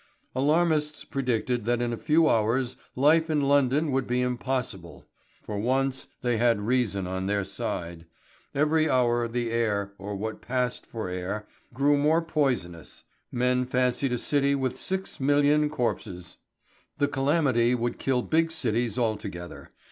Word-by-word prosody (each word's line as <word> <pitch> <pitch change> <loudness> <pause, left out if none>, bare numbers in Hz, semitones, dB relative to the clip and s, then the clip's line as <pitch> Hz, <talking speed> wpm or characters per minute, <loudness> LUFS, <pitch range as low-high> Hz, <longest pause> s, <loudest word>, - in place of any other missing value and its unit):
Alarmists 150 +2 +1
predicted 125 -3 -1
that 120 0 +1
in 120 -1 -1
a - - -1
few 155 +6 +3
hours 120 +1 +1 0.2
life 160 +5 +4
in 155 -1 +2
London 140 +2 +2
would 135 -1 0
be 125 +1 0
impossible. 125 -7 -3 0.4
For 105 -1 -4
once 130 +3 0 0.2
they 120 -2 +1
had 115 -3 +3
reason 110 -4 0
on 95 +1 -3
their 100 0 0
side. 85 -3 -5 0.5
Every 155 +2 +2
hour 120 -2 +2
the 120 0 -2
air, 105 -4 0
or 100 +1 -5
what 110 +2 -5
passed 125 0 -2
for 110 -4 -5
air, 90 +4 -4 0.2
grew 140 +4 +3
more 155 +3 +3
poisonous. 120 - -2 0.3
Men 125 +1 +1
fancied 125 +1 +1
a - - +1
city 140 +2 +1
with 130 -1 -2
six 190 0 -3
million 145 +2 +3
corpses! 105 -10 -3 0.6
The 145 - +2
calamity 135 -4 +2
would 120 0 -2
kill 130 -2 +1
big 165 +1 +2
cities 120 -6 -1
altogether. 105 -7 -3
125 Hz, 145 wpm, -27 LUFS, 110-140 Hz, 0.6 s, life